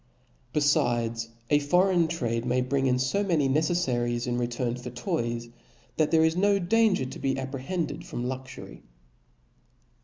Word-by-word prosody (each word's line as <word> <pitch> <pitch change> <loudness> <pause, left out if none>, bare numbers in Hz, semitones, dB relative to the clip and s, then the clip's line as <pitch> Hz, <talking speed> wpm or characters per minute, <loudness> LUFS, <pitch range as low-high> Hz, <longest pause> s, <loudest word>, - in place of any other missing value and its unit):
Befides, 120 -6 +1 0.2
a. 145 - +5
foreign 175 +3 +3
trade 120 -8 -2
[ - - -8
Cbap'6. - - -3 0.2
niay - - -8
bring 135 -1 +1
in 125 -1 +2
fo 130 +11 0
many 165 -8 +2
neceflarics 130 -6 0
in 120 -1 -1
return 120 0 -2
for 125 0 -7
toys, 120 -3 -3 0.5
that 155 -1 +2
there 160 0 +4
is 160 +1 +1
no 200 +2 +3
danger 195 -3 +2
to 130 - -8
be 135 -1 -1
apprehended 135 +6 -4
from 120 - -5
luxury. 130 +1 -7
135 Hz, 155 wpm, -27 LUFS, 120-165 Hz, 0.5 s, a